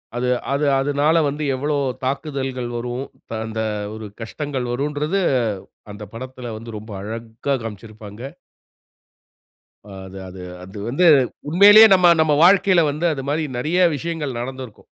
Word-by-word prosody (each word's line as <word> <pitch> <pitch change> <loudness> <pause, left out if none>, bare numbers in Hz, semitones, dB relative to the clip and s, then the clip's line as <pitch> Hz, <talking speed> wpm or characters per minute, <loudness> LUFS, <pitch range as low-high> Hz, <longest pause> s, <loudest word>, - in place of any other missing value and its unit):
அது 125 +1 -1 0.3
அது 145 +2 0
அதனால 145 +4 +2
வந்து 145 +2 -3
எவ்ளோ 145 +3 -1 0.3
தாக்குதல்கள் 135 -2 -3
வரும். 120 +2 -4 0.3
த - - -15
அந்த 110 0 -4 0.3
ஒரு 110 0 -8 0.2
கஷ்டங்கள் 130 +1 -4
வரும்ன்றது. 150 +8 -1 0.7
அந்த 105 +1 -9
படத்துல 125 -1 -7
வந்து 115 +2 -10
ரொம்ப 110 +1 -10
அழகா 115 +5 -4
காண்பிச்சிருப்பாங்க. 110 0 -9 1.6
அ 105 - -15 0.2
அது 95 +1 -10
அது 95 0 -10 0.2
அது 95 +3 -10
வந்து 145 +9 +2 0.4
உண்மையிலயே 205 +6 +9
நம்ப 180 -2 +5
நம்ம 155 -1 +3
வாழ்க்கையில 185 -2 +5
வந்து 155 +4 -3
அது 135 -2 -5
மாரி 155 +2 0
நிறைய 155 +9 0 0.2
விஷயங்கள் 150 -4 -4
நடந்திருக்கும். 130 -2 -7
130 Hz, 130 wpm, -21 LUFS, 115-150 Hz, 1.6 s, உண்மையிலயே